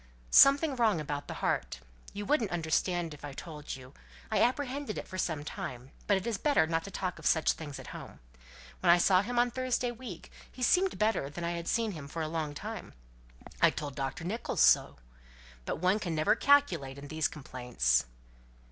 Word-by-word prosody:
"Something 280 +1 +7
wrong 220 -8 +2
about 145 -1 -4
the - - -6
heart. - - -1 0.3
You 205 0 -5
wouldn't 250 -6 +1
understand 170 0 0
if 150 - -14
I 145 -1 -6
told 150 0 -7
you. 130 -1 -13 0.4
I - - +2
apprehended 265 -1 0
it - - -6
for 185 - -6
some 155 -5 -1
time; 130 -3 -7 0.2
but 200 - +4
it's 230 -4 -2
better 290 - +3
not 165 0 -1
to - - -7
talk 180 -2 -4
of 160 - -12
such 160 - +3
things 145 -3 -7
at - - -10
home. - - -10 0.6
When 180 - +1
I 170 - +8
saw 185 +1 +4
him 240 +4 -4
on 240 0 +3
Thursday 255 -1 -1
week, 230 -8 -9 0.2
he 255 - -6
seemed 370 +8 +3
better 215 -10 +1
than 170 +4 -7
I've 170 0 -3
seen 225 -2 +1
him 155 -6 -8
for 160 +3 -4
a - - -2
long 155 -2 -3
time. - - -7 0.7
I - - +7
told 145 -2 -5
Dr. 135 +3 -4
Nicholls 210 +7 -2
so. - - +5 0.7
But - - -2
one 185 +5 +2
never 155 -2 +2
can - - -9
calculate 170 - +3
in 140 +1 -9
these 155 +1 0
complaints." 125 - 0
170 Hz, 190 wpm, -31 LUFS, 150-230 Hz, 0.7 s, I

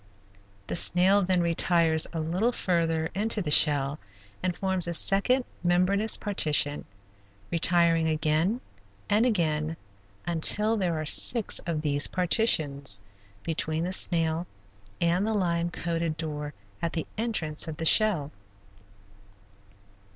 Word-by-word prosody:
The - - -5
snail 185 +4 +4
then 185 -1 0
retires 165 -1 +1
a 165 - -5
little 180 +9 -1
further 165 -6 -2
into 215 +3 -1
the 165 -7 -4
shell 145 -1 +3 0.4
and 180 -1 -3
forms 190 -2 0
a 170 - 0
second 250 +9 +5 0.2
membranous 185 +5 +1
partition, 150 -7 -1 0.7
retiring 170 -1 +1
again 160 +8 -1 0.5
and 215 +4 +2
again 160 -6 -2 0.5
until 210 +6 +2
there 175 -6 -2
are 155 - -5
six 225 +8 +5
of 160 -3 -3
these 145 -1 0
partitions 155 - +1 0.4
between 160 0 -3
the 180 +2 -2
snail 165 -1 +1 0.5
and 175 +4 0
the 220 - -1
lime 170 -3 -1
coated 165 -2 -4
door 150 -2 -5 0.3
at 170 - -3
the 160 - -4
entrance 185 -10 -3
of 155 -1 -7
the 160 - -5
shell. 170 -7 +2
170 Hz, 120 wpm, -26 LUFS, 155-190 Hz, 0.7 s, second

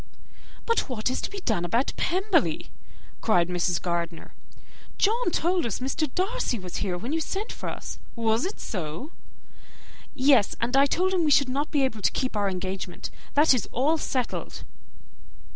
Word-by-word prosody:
"But 460 -9 +1
what 245 -1 -1
is - - -2
to - - -3
be 400 -1 -7
done 220 - 0
about 230 +10 +1
Pemberley?" 385 +4 +1 0.5
cried 180 -6 +3
Mrs. 175 0 +1
Gardiner. 170 -1 -3 0.6
"John 455 +1 +2
told 350 +1 +1
us 225 - -1
Mr. 270 +3 -1
Darcy 390 - 0
was 185 -3 -6
here 185 -4 -1
when 235 - -4
you 325 - +1
sent 400 +7 -3
for - - -5
us; - - -7 0.2
was 225 +1 +1
it 385 - -4
so?" 180 - -5 1.0
"Yes; 265 -6 +4
and 240 +3 0
I 275 +1 +6
told 370 +6 +1
him 360 -3 +2
we 310 - +3
should 280 -2 +5
not 280 +4 -1
be 285 -3 +2
able 225 -5 -1
to - - +3
keep 255 -3 -1
our 205 -1 +1
engagement. 185 -1 -4 0.2
That 295 0 +6
is 250 - -1
all 305 +6 +2
settled." 255 -4 -3
255 Hz, 170 wpm, -26 LUFS, 195-320 Hz, 1.0 s, I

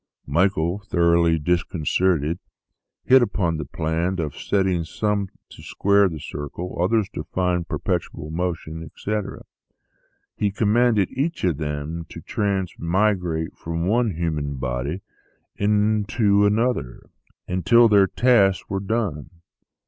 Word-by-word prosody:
Michael, 85 +3 +1
thoroughly 85 -2 +3
disconcerted, 85 0 0 0.6
hit 130 0 +6
upon 90 -8 0
the 75 - -4
plan 80 +4 -2
of 75 -3 -3
setting 95 -4 0
some 100 +3 -1 0.2
to - - -13
square 100 0 +2
the 80 -3 -7
circle, 75 +6 -6
others 105 +2 +2
to 75 - -6
find 90 -1 0
the - - -7
perpetual 80 -1 -3
motion, 80 -1 -3
etc. 100 +6 -5 0.9
He 105 - 0
commanded 105 0 +2
each 150 +6 -2
of 85 -6 +1
them 75 +2 -4
to - - -9
transmigrate 95 -3 -1
from 85 0 -4
one 110 -1 +1
human 75 -4 -2
body 65 +8 -3 0.5
into 105 0 +2
another, 110 - -1 0.4
until 95 +7 +4
their 100 -3 +5
tasks 105 -6 +3
were 95 - -2
done. 95 -8 -2
90 Hz, 120 wpm, -23 LUFS, 80-105 Hz, 0.9 s, hit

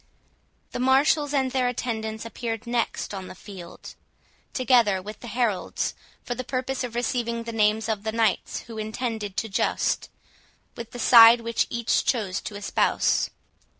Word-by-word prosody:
The - - -4
marshals 275 +3 +3
and 265 -3 +1
their 255 -1 +1
attendants 220 -3 -3
appeared 225 -1 -5
next 235 -3 -2
on 190 -2 -6
the - - -10
field, 185 -2 -11 0.6
together 235 -6 +3
with 210 +3 -9
the 240 - -9
heralds, 230 -6 -1 0.3
for 245 - -3
the 255 +1 -5
purpose 260 +1 -2
of 240 -2 -5
receiving 235 -1 -1
the 230 - -5
names 215 0 +2
of 220 -3 -1
the 220 +1 -3
knights 225 0 0
who 225 -2 -9
intended 215 -2 -4
to 225 - -1
joust, 195 - 0 0.7
with 235 -1 -7
the - - -9
side 235 0 +8
which 230 0 0
each 235 -1 +1
chose 205 -7 -1
to 210 - -7
espouse. 205 0 +1
230 Hz, 155 wpm, -25 LUFS, 215-245 Hz, 0.7 s, side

